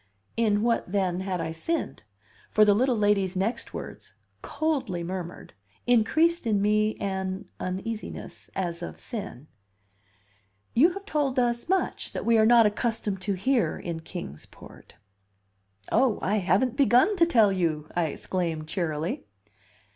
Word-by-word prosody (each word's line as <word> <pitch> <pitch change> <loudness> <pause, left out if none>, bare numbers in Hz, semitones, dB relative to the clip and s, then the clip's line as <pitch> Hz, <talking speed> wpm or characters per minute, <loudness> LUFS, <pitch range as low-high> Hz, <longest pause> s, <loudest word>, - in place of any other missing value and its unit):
In 215 -2 +2
what, 230 -6 0
then, 185 -3 0
had 190 -1 -2
I 160 - -3
sinned? 315 - -3 0.5
For 215 - +5
the 205 - +5
little 250 +3 +2
lady's 200 -3 +2
next 195 +6 -2
words, - - -9 0.3
coldly 270 - -2
murmured, 175 - -6 0.3
increased 310 +7 +3
in 210 -2 +2
me 215 +1 +2
an 190 -1 -3
uneasiness, 210 +4 -5
as 175 -2 -3
of 170 - -7
sin: 200 - -6 1.3
"You 330 +9 +5
have 395 +1 -8
told 290 -7 -1
us 240 +2 0
much 380 0 -1
that - - -4
we 230 -1 +4
are 220 - +5
not 235 -1 +7
accustomed 210 -2 -1
to 200 +1 -1
hear 195 - +1
in 170 -2 -5
Kings 160 - -8
Port." - - -15 1.0
"Oh, 255 -5 +3
I 205 +3 +1
haven't 205 +6 +1
begun 275 - +4
to 335 -1 +5
tell 225 -11 +4
you!" 160 -5 -1
I 175 -1 +2
exclaimed 160 0 -3
cheerily. 160 - -2
205 Hz, 140 wpm, -27 LUFS, 180-240 Hz, 1.3 s, not